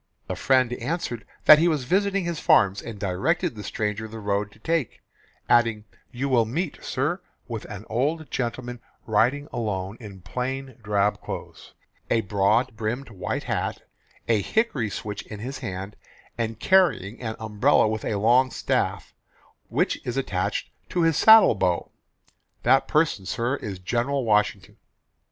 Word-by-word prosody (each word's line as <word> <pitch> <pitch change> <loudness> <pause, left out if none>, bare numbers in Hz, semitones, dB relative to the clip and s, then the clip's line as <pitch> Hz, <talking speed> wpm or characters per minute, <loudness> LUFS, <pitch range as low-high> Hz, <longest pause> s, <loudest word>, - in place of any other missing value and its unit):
The - - -4
friend 130 -2 +2
answered 125 -2 -4 0.2
that 155 0 +10
he 170 - +4
was 155 -5 +1
visiting 195 +6 +1
his 170 -2 -3
farms, 100 -1 +4
and 110 -3 -8
directed 155 - 0
the 105 -2 -8
stranger 105 +1 -3
the 115 +1 -9
road 100 -1 -1
to - - -19
take, 160 +2 -1 0.5
adding, 115 -3 +3 0.3
"You 130 +3 -2
will 120 -4 +3
meet, 155 +8 -3
sir, 150 +8 -1 0.3
with 115 -3 -5
an 105 +1 -8
old 150 +7 -1
gentleman 120 0 -3 0.3
riding 125 +7 +2
alone 105 -4 -3
in 100 -5 -10
plain 130 +5 -4
drab 105 -1 +1
clothes, - - -8 0.3
a 115 - +3
broad 110 +5 +1
brimmed 115 +4 -3
white 95 - -3
hat, - - -2 0.4
a 110 -3 +3
hickory 150 - 0
switch 105 +1 -5
in 105 - -7
his 130 +6 -5
hand, 95 -3 -6 0.4
and 115 -1 -3
carrying 130 - +2
an 110 -2 -3
umbrella 110 -1 +3
with 110 0 -2
a 110 - -1
long 120 +6 +4
staff, - - -1 0.6
which - - 0
is 125 +2 -4
attached 105 -6 -2 0.2
to 175 - 0
his 165 -2 +3
saddle 220 +6 +8
bow 90 -2 -1 0.7
that 130 +3 +4
person, 150 - +1
sir, 120 +4 -1
is 100 -3 -6
General 120 +8 -1
Washington." 105 -1 +1
115 Hz, 150 wpm, -25 LUFS, 105-135 Hz, 0.7 s, that